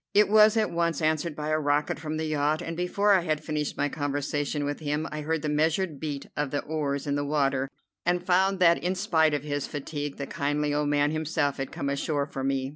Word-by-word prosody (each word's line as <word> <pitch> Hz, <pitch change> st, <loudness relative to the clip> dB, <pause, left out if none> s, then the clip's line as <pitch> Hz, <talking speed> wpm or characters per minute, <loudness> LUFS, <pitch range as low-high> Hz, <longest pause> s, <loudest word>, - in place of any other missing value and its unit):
It 210 Hz, 0 st, +6 dB
was 215 Hz, +1 st, +6 dB
at 215 Hz, -1 st, +1 dB
once 170 Hz, -2 st, 0 dB
answered 155 Hz, 0 st, 0 dB
by 150 Hz, 0 st, -4 dB
a 155 Hz, 0 st, +2 dB
rocket 145 Hz, 0 st, 0 dB
from 155 Hz, 0 st, -4 dB
the 160 Hz, -, -2 dB
yacht, 155 Hz, 0 st, +1 dB
and 165 Hz, -, -4 dB
before 200 Hz, +4 st, +2 dB
I 190 Hz, -, +4 dB
had 155 Hz, -3 st, -1 dB
finished 150 Hz, -2 st, -2 dB
my 145 Hz, -, +1 dB
conversation 145 Hz, 0 st, -2 dB
with 145 Hz, 0 st, -3 dB
him 150 Hz, +1 st, -2 dB
I 150 Hz, -, -4 dB
heard 160 Hz, +1 st, -1 dB
the -, -, -1 dB
measured 155 Hz, +1 st, +1 dB
beat 145 Hz, -3 st, -4 dB
of 145 Hz, -1 st, -1 dB
the 145 Hz, +1 st, -2 dB
oars 145 Hz, -2 st, -2 dB
in 145 Hz, -, -1 dB
the 145 Hz, 0 st, 0 dB
water, 140 Hz, -2 st, 0 dB, 0.3 s
and 175 Hz, 0 st, 0 dB
found 190 Hz, +2 st, +3 dB
that 170 Hz, -2 st, +4 dB
in 180 Hz, +2 st, 0 dB
spite 160 Hz, -6 st, +2 dB
of 145 Hz, -, -3 dB
his 145 Hz, -2 st, -2 dB
fatigue 145 Hz, 0 st, -5 dB
the 140 Hz, -, -3 dB
kindly 145 Hz, +1 st, -1 dB
old 145 Hz, 0 st, +1 dB
man 145 Hz, 0 st, +2 dB
himself 155 Hz, -2 st, -1 dB
had 135 Hz, -1 st, -4 dB
come 140 Hz, -, -4 dB
ashore 140 Hz, +1 st, 0 dB
for 135 Hz, -2 st, -6 dB
me. 135 Hz, -1 st, 0 dB
150 Hz, 230 wpm, -27 LUFS, 145-165 Hz, 0.3 s, It